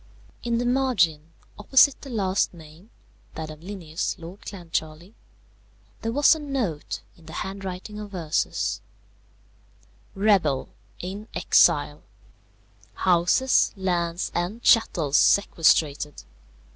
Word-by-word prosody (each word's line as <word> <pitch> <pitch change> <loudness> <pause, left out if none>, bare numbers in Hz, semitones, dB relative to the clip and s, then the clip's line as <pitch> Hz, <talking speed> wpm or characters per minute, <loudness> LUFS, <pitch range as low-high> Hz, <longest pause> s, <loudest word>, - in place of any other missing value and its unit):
In 235 0 -1
the 245 - -1
margin, 190 - +1 0.3
opposite 265 +5 +4
the 275 - -10
last 195 -6 0
name 160 +5 -15 0.5
(that 155 -1 -6
of 155 - -11
Linnæus, 175 -2 -4
Lord 175 +3 -11
Clancharlie), 170 -1 -5 0.9
there 225 - -2
was 290 +6 +5
a 320 - -4
note 255 - -3
in 165 -2 -20
the 160 - -10
handwriting 195 +1 -7
of 205 -2 -8
Ursus: 160 -3 -1 1.4
_Rebel; 190 -10 +2 0.3
in 200 +4 -7
exile; - - +3 0.9
houses, 185 +9 +3
lands, 175 -2 -2
and 185 +7 -3
chattels 165 - +3
sequestrated. 155 -6 +2
185 Hz, 105 wpm, -25 LUFS, 165-215 Hz, 1.4 s, was